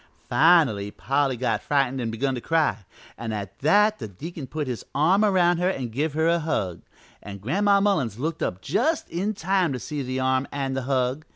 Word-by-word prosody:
"Finally 150 - +4
Polly 135 +3 0
got 115 -3 0
frightened 135 -2 0
and 115 -2 -2
begun 135 +4 -1
to 125 - -4
cry, 130 - 0 0.3
an' 115 -1 -4
at 100 -2 -6
that 210 +8 +3
the - - -5
deacon 140 - -8
put 150 +3 -3
his 125 -3 -4
arm 175 +9 +3
around 180 -4 +3
her 180 +1 +2
an' 130 -10 -3
give 145 +6 -2
her 160 +2 +1
a 170 0 +3
hug, 100 - -2 0.4
an' 100 -1 -8
Gran'ma 200 - +2
Mullins 150 - +1
looked 160 +5 -3
up 90 +1 -2
just 320 0 0
in 200 +5 -2
time 190 -2 +1
to 125 - -4
see 150 +4 -5
the 130 0 -3
arm 130 +1 +1
an' 135 -1 -2
the 135 - -2
hug. 130 +2 0
140 Hz, 200 wpm, -24 LUFS, 120-170 Hz, 0.4 s, Finally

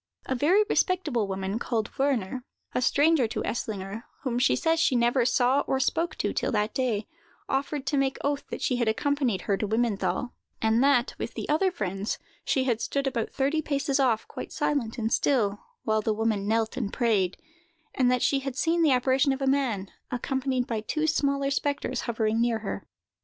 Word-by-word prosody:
A - - -1
very 330 - +4
respectable 305 - +1
woman, 190 +2 -2
called 230 -2 -2
Wörner—a 255 -2 -2
stranger 290 0 +3
to - - -3
Eslinger, 210 0 -4 0.2
whom 245 -3 -1
she 250 - +4
says 325 -1 +1
she 275 - +3
never 240 +1 +3
saw 250 +2 +3
or 265 - +1
spoke 325 +6 0
to - - -1
till - - -1
that 210 0 0
day—offered 265 +4 -3
to 280 +1 0
make 270 -1 +1
oath 285 0 -1
that - - -5
she 250 - +1
had 235 -2 0
accompanied 250 -3 +1
her 200 - 0
to 210 - -2
Wimmenthal, 230 +2 0 0.3
and 225 +3 +3
that, 275 -3 +3
with - - -4
the - - -4
other 320 +6 +3
friends, 195 - -3 0.3
she 265 - +1
had 235 -3 0
stood 280 0 -1
about 245 -4 -1
thirty 285 +4 0
paces 280 -1 0
off, 240 -5 +2
quite - - -7
silent 245 -6 -1
and 225 0 -1
still, 210 -7 +2 0.2
while 220 -1 +1
the 215 0 0
woman 215 -2 0
knelt 225 0 +1
and 200 - -2
prayed; 210 -7 +1 0.6
and 255 -2 +3
that 250 -1 +2
she 275 - +3
had 270 -2 -5
seen 330 +4 +1
the 320 - +5
apparition 260 +2 +3
of 270 - -2
a - - +2
man, 255 -8 0 0.2
accompanied 260 0 -1
by 225 -3 -2
two 310 +8 -1
smaller 280 -3 +1
spectres, 280 -3 -1
hovering 225 -1 +1
near 235 -1 +2
her. - - -4
250 Hz, 185 wpm, -27 LUFS, 220-280 Hz, 0.6 s, the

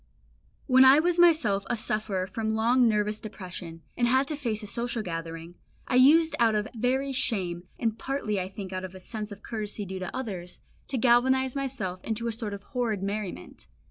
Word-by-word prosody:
When 260 -1 +6
I 265 +3 +8
was 350 +2 +1
myself 310 - +4
a 240 - 0
sufferer 215 -4 -2
from 220 +3 -3
long 235 +3 +3
nervous 210 0 0
depression, 180 -5 -8
and 240 - +2
had 260 +3 +3
to 305 - -1
face 230 -7 -3
a - - -5
social 235 +2 -2
gathering, 165 -1 -6 0.3
I - - -3
used 310 +6 +6
out 225 -2 +4
of 210 0 0
very 260 +4 0
shame, 180 -9 -1
and 225 -1 -1
partly 265 -7 -2
I 185 0 -3
think 190 -1 -7
out 185 0 -3
of 185 0 -7
a - - -9
sense 215 +2 -6
of 205 +1 -10
courtesy 210 -2 -4
due 190 0 -6
to 185 -1 -4
others, 190 -9 -5 0.3
to 265 - -2
galvanise 260 +2 +3
myself 230 -10 -3
into 225 +1 -3
a 230 - 0
sort 220 -2 -4
of 200 - -11
horrid 230 -7 -2
merriment. 200 - -5
220 Hz, 195 wpm, -27 LUFS, 195-255 Hz, 0.3 s, I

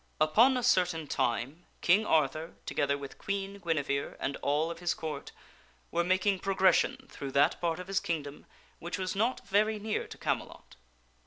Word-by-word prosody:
UPON 225 - +5
a 250 - -2
certain 180 -8 +2
time 135 +5 -2
King 200 +5 +4
Arthur, 155 +2 +1
together 140 0 0
with 140 -1 -9
Queen 200 0 -3
Guinevere 145 -5 -1
and 140 +1 -2
all 150 +4 0
of 170 - -8
his 175 -1 0
Court, 150 -3 -5 0.6
were 170 +1 +1
making 190 +2 +2
progression 190 -1 +2
through 140 -1 -6
that 140 - +3
part 170 -1 0
of 180 - -6
his 195 +1 0
kingdom 150 -4 -4 0.3
which 175 +1 -4
was 185 0 -3
not 230 +6 0
very 215 +2 +2
near 210 +1 -2
to - - -10
Camelot. - - -4
170 Hz, 165 wpm, -30 LUFS, 150-195 Hz, 0.6 s, UPON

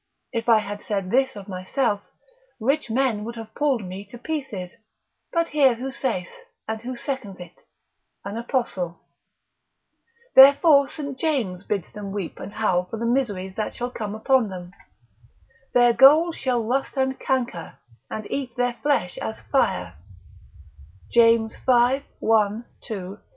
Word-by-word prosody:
(If 230 +1 -2
I 230 - +7
had 205 -1 -4
said 195 -3 -2
this 265 0 +2
of 200 -1 -9
myself, 200 +3 -1 0.6
rich 275 +4 0
men 230 -3 +1
would 235 +2 -6
have 225 -1 -9
pulled 275 -6 +1
me 185 +2 -7
to 210 +5 -12
pieces; 235 - -5 0.6
but 335 -1 +1
hear 275 -5 +4
who 260 +3 -5
saith, 230 -9 -3 0.4
and 220 0 -3
who 250 +2 -5
seconds 235 -7 -5
it, 175 -1 -10 0.7
an 200 +1 -5
Apostle) 230 -8 -2 1.3
therefore 280 +1 +7
St. 280 -4 -6
James 230 - -1
bids 200 -5 -2
them 205 -1 -6
weep 195 -4 -5
and - - -7
howl 180 -5 +1
for 225 - -6
the 230 - -3
miseries 210 -7 -1
that 215 - -3
shall 245 +1 -4
come 215 -3 -5
upon 230 0 +2
them; 180 -1 -8 1.0
their 245 -1 +6
gold 300 +7 +6
shall 250 -3 0
rust 265 +5 -1
and 265 0 0
canker, 240 -10 -2 0.3
and 215 - -5
eat 270 -3 -3
their 245 0 0
flesh 280 -12 0
as 220 - -5
fire, 90 - +1 1.1
James 230 -1 +4
v. 250 +2 +3 0.2
1, 220 +1 +2 0.2
2, 195 -2 -6
3. - - -33
230 Hz, 150 wpm, -24 LUFS, 200-265 Hz, 1.3 s, I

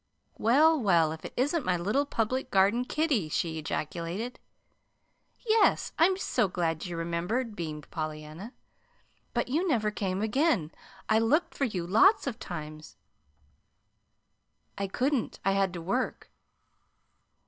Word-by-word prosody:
"Well, 300 +6 +4
well, 170 -7 +3
if 160 0 -8
it - - -7
isn't 290 +6 +1
my 180 -1 +1
little 210 +12 0
Public 255 +1 -1
Garden 200 +6 +3
kiddie!" 270 - 0
she 160 +1 -1
ejaculated. 170 +9 -4 1.1
"Yes. 440 -1 +3
I'm 370 +3 +4
so 245 - +1
glad 170 -1 -2
you 175 -1 -5
remembered," 175 +8 -2
beamed 155 -4 -6
Pollyanna. 155 +5 -6 0.8
"But - - 0
you 325 +8 +1
never 215 -9 +1
came 195 -1 -2
again. 220 - +1 0.4
I 220 0 +4
looked 280 +10 +2
for 275 - 0
you 185 -8 -3
lots 375 - +5
of 245 -4 -4
times." 155 -3 -8 1.8
"I 200 - -2
couldn't. 255 +5 -1
I 195 - +4
had 195 -1 +1
to 175 - -5
work. 245 +9 -2
205 Hz, 130 wpm, -29 LUFS, 170-260 Hz, 1.8 s, lots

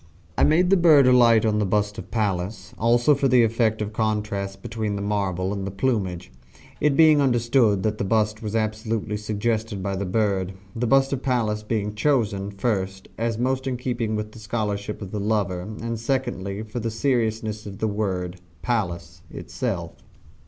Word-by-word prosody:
I - - +2
made 180 +4 +4
the 195 - +6
bird 155 -6 +6
alight 120 -3 +5
on 105 -1 +2
the - - +2
bust 105 +2 0
of - - -9
Pallas, 95 -3 -2
also 120 +5 +4
for 140 -1 +1
the 125 -2 +5
effect 110 -1 +1
of 105 +1 -6
contrast 105 -3 -2
between 110 -3 -3
the 100 - -3
marble 95 -2 -1
and 100 -1 -4
the 100 - -3
plumage 95 -5 -2 0.5
it 145 -1 +2
being 155 -2 +6
understood 120 -5 +2
that 110 -1 -1
the - - 0
bust 110 +1 +1
was 110 0 -4
absolutely 110 -1 -1
suggested 105 0 -2
by 100 0 -2
the 95 0 -3
bird 95 -2 0 0.2
the 120 +1 -1
bust 135 +2 +3
of 135 - -2
Pallas 115 -6 0
being 105 -1 -2
chosen, 105 -5 0
first, 95 -2 -2
as 115 -1 -1
most 130 +2 -1
in 130 -2 -1
keeping 120 -3 -2
with 105 0 -4
the 115 - -12
scholarship 105 -1 -3
of 95 - -8
the 105 - -3
lover, 100 -3 0
and 110 +4 -5
secondly, 115 -5 -2
for 110 +2 -5
the 115 0 -2
sonorousness 110 -3 -1
of 95 -1 -8
the 110 - -1
word, 95 -4 -2 0.3
Pallas, 100 -9 -2
itself. - - -4
110 Hz, 180 wpm, -24 LUFS, 100-120 Hz, 0.5 s, the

